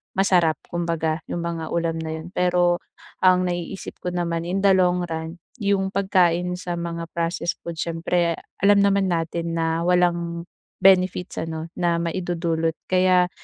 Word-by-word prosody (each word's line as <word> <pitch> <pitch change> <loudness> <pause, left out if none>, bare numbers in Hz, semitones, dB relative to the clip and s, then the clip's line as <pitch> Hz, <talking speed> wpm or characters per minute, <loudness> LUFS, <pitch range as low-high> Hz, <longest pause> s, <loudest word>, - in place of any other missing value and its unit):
masarap 180 -5 +3 0.2
kumbaga, 165 -2 -1
'yong 170 - -3
mga 165 -2 -3
ulam 165 -1 -1
na 160 0 -4
'yon. 160 +3 -8
Pero 175 -1 +2 0.4
ang 185 0 +4
naiisip 175 +2 -4
ko - - -7
naman 170 -1 -2
in 190 +2 -1
the 200 - +6
long 180 -1 +3
run 160 -1 -5 0.3
'yong 195 -1 +1
pagkain 180 -2 +2
sa 180 -1 -4
mga 170 -1 -4
processed 170 0 -2
food 170 -1 -6
siyempre 170 +1 0 0.2
alam 200 +1 +5
naman 200 -1 +3
natin 170 -1 -2
na 165 0 0
walang 175 -1 +1 0.4
benefits, 185 -1 +3
ano, 160 0 -4
na 170 -1 +1
maidudulot. 165 -2 -1 0.2
Kaya 185 -1 +4
175 Hz, 145 wpm, -23 LUFS, 165-180 Hz, 0.4 s, the